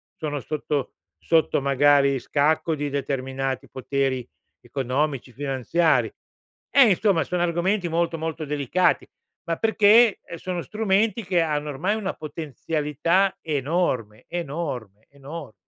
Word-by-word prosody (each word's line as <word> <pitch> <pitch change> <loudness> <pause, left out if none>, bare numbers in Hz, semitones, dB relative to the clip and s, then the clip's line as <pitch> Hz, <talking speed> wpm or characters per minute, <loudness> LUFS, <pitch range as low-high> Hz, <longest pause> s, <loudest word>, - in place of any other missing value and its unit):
sono 150 -2 -3
sotto 145 0 -3 0.3
sotto, 160 -3 +2
magari, 140 0 +4
scacco 150 +5 +1
di 145 -1 -3
determinati 135 -1 -3
poteri 130 -1 -2 0.3
economici, 130 +1 -2
finanziari. 145 +5 +1 0.6
Eh, 270 -5 +7
insomma, 195 -2 +3
sono 180 -1 -1
argomenti 175 +2 0
molto, 165 0 0
molto 160 -1 -4
delicati, 150 +5 +1 0.4
ma 165 -1 -1
perché, 220 0 +5
uhm, 170 - -6
sono 180 -1 -4
strumenti 215 +1 +1
che 180 -1 +1
hanno 150 -2 -1
ormai 180 +10 -1
una 210 -3 -3
potenzialità 155 +5 -1
enorme, 140 - -1
enorme, 140 - -5
enor 140 -2 -9
150 Hz, 115 wpm, -24 LUFS, 135-175 Hz, 0.6 s, Eh